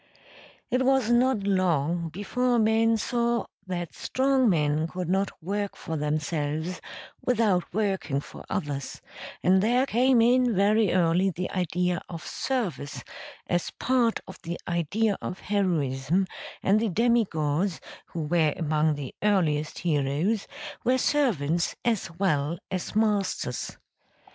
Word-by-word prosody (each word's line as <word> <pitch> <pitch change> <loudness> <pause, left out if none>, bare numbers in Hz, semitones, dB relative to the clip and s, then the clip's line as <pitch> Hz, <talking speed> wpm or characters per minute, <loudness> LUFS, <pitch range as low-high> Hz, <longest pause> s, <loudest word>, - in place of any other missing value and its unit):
It 255 +1 +2
was 260 -3 +3
not 240 -3 +3
long 175 -4 +1
before 240 +8 0
men 225 0 +3
saw 235 +1 0 0.2
that 175 -3 -4
strong 265 -2 +2
men 155 -2 +1
could 180 +1 -5
not 195 +2 +1
work 200 +3 -2
for 160 -3 -5
themselves 155 +2 -2 0.4
without 215 -7 +1
working 190 -8 0
for - - -10
others, 140 -3 -3 0.4
and 185 +1 +5
there 245 +5 +3
came 255 0 +3
in 245 0 +4
very 205 +1 +3
early 180 +1 +3
the 180 +1 -4
idea 180 -1 0
of 165 -2 -7
service 200 - -3 0.4
as 175 -1 -1
part 245 -3 +1
of - - -11
the 170 -1 -5
idea 195 +5 0
of 185 - -4
heroism, 170 -4 0 0.4
and 200 +2 +4
the 225 0 0
demi 235 +4 +3
gods, 160 +2 -1 0.3
who 165 - -4
were 155 -1 +2
among 155 -1 +1
the 140 -3 -6
earliest 160 -8 +1
heroes, 155 +7 0 0.4
were 255 +1 +3
servants 175 - +1
as 225 -6 0
well 165 -4 +1
as 185 +2 -4
masters. 205 - 0
185 Hz, 130 wpm, -27 LUFS, 160-225 Hz, 0.4 s, and